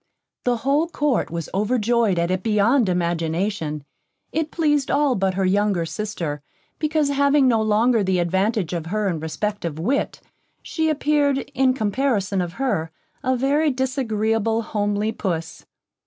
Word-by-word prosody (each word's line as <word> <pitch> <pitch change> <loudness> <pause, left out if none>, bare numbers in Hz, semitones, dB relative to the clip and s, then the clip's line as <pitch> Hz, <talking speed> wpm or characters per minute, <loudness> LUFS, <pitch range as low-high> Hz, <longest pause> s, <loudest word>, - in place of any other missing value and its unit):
The 245 -1 +2
whole 290 +4 +2
Court 295 -6 0
was 170 -1 -4
overjoyed 220 0 +1
at 170 +1 +1
it 185 0 0
beyond 215 +3 +3
imagination; 170 -2 -1 0.5
it 315 0 -1
pleased 295 -5 +1
all 290 -2 +2
but 190 -4 0
her 195 0 +1
younger 195 -2 +1
sister; 170 -7 -4 0.4
because 305 -2 +1
having 280 0 +3
no 230 -3 +3
longer 220 +1 +3
the 190 -1 +1
advantage 190 +2 0
of 165 -2 -3
her 210 +3 -1
in 170 -4 -1
respect 205 +7 -3
of 165 -3 -3
wit, 240 - -1 0.4
she 320 -1 -1
appeared, 290 -2 +1
in 260 -1 +2
comparison 210 -4 0
of 175 -1 -4
her, 205 -12 -1 0.3
a 260 -1 +1
very 285 +5 +2
disagreeable, 225 -4 0
homely 205 0 -1
puss. 170 -7 -4
215 Hz, 145 wpm, -22 LUFS, 185-270 Hz, 0.5 s, beyond